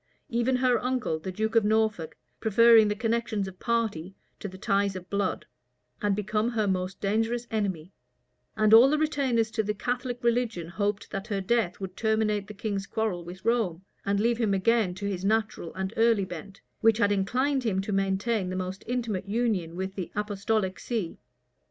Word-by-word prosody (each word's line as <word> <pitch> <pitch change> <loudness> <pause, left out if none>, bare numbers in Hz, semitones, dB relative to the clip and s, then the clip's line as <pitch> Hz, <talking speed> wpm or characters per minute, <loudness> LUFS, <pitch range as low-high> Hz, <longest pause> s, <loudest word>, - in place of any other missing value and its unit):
Even 240 +2 +1
her 250 -1 +2
uncle, 250 -10 -1
the 185 +4 -5
duke 220 +4 -2
of 225 - +5
Norfolk, 215 -5 0 0.2
preferring 225 0 +6
the 210 - 0
connections 225 -2 -1
of 185 -1 -10
party 215 -7 -1 0.2
to - - -5
the 190 -1 -10
ties 195 0 +1
of 180 -1 -7
blood, 200 -2 -1 0.6
was 205 -2 +2
become 210 +2 0
her 225 -3 0
most 185 0 -2
dangerous 225 +4 0
enemy; 190 -6 -2 0.6
and 215 0 +4
all 235 +4 +9
the 305 - +2
retainers 270 -7 +1
to 225 - 0
the 210 0 -2
Catholic 245 +2 -3
religion 235 -8 0
hoped 205 +2 -2
that 195 +1 -4
her 205 -3 -1
death 200 -2 0
would 190 -1 -6
terminate 220 -2 0
the 210 - -9
king's 200 -1 -3
quarrel 215 -6 -2
with 180 +3 -10
Rome, 215 -7 +1 0.2
and 200 0 0
leave 230 +2 +1
him 210 -4 +2
again 210 -2 +2
to 200 +2 -6
his 190 -2 -3
natural 215 -4 0
and 190 +2 -3
early 225 -3 +3
bent, 185 +2 -9 0.2
which 225 -1 +4
had 205 -3 +3
inclined 255 +8 +1
him 205 -5 0
to 200 - -5
maintain 195 +1 0
the 185 - -3
most 185 +1 -4
intimate 225 -6 -2
union 205 -7 0
with 190 +1 -4
the 185 -4 -5
apostolic 205 -1 -1
see. 220 -9 -3
210 Hz, 180 wpm, -27 LUFS, 190-230 Hz, 0.6 s, all